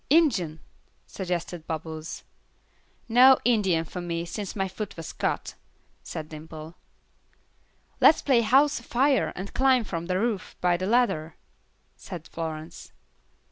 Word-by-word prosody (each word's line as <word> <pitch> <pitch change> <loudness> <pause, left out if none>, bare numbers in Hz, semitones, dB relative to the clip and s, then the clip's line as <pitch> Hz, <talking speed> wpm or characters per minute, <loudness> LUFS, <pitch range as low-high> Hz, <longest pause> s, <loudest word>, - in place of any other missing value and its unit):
"Injun," 220 - +3 0.4
suggested 175 -3 -4
Bubbles. 160 0 -5 0.8
"No 250 +3 +7
Indian 195 -9 +2
for 180 +3 -6
me, 170 -1 -3
since 200 +2 -5
my 195 -2 0
foot 205 +1 -6
was 165 - -7
cut," - - -2 0.5
said 155 -1 -6
Dimple. 155 +1 -9 1.3
"Let's 315 - +6
play 260 -4 +4
house 275 +6 +4
afire 260 +4 +1
and 190 +2 -7
climb 260 -2 +4
from 170 -5 -5
the 185 0 0
roof 220 -3 -2
by 180 -1 +3
the 185 +2 -2
ladder," 210 -9 +1 0.6
said 170 -4 -8
Florence. 160 -1 -6
185 Hz, 125 wpm, -26 LUFS, 165-240 Hz, 1.3 s, No